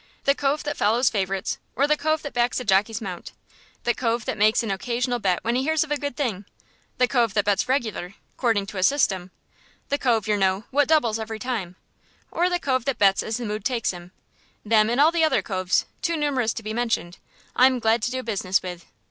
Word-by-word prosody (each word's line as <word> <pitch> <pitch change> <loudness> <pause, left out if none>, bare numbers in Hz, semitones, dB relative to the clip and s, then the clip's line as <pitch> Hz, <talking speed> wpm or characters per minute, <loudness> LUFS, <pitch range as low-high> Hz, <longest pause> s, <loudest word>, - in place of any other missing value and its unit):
The 275 - +4
cove 285 +1 -1
that 295 -1 -3
follows 230 +5 +2
favourites, 195 -2 -2 0.2
or 275 - +3
the 300 +1 +3
cove 310 +1 -1
that 285 - -6
backs 240 +1 +1
a - - -5
jockey's 210 +3 +2
mount, 185 -5 -7 0.5
the 240 - +2
cove 230 -2 -1
that - - -2
makes 215 +3 +3
an 220 - -2
occasional 240 +5 -1
bet 185 -5 0
when 235 - 0
he 250 - +1
hears 315 +2 +1
of 305 - -10
a - - +3
good 285 -3 -5
thing, 215 -8 -2 0.5
the 250 - +3
cove 235 -5 +1
that 205 -1 +2
bets 205 +4 +1
regular, 220 -8 -2 0.2
'cording 225 -5 +1
to 195 -1 -6
a - - 0
system 190 -9 +2 0.6
the 285 - 0
cove, 230 -5 +1
yer 210 -1 +2
know, 190 +1 +1
what 290 +1 +3
doubles 240 -9 +2
every 220 0 -5
time 215 -6 -4 0.6
or 350 +2 +1
the 355 - +1
cove 260 -7 -1
that 275 -4 -1
bets 195 -1 +4
as 220 +1 -3
the 245 - -5
mood 210 0 -4
takes 240 -4 0
him 175 0 -11 0.5
them 215 0 +4
and 240 +3 0
all 305 +3 +6
the 335 -1 +1
other 315 - +2
coves, 185 -3 0 0.2
too 335 -2 0
numerous 270 -6 0
to 225 - -7
be 215 +1 -4
mentioned, 225 -7 -2 0.4
I'm 255 0 +5
glad 225 -1 +2
to 245 - 0
do 255 0 -4
business 195 -5 0
with. 180 -1 -7
230 Hz, 225 wpm, -24 LUFS, 205-270 Hz, 0.6 s, all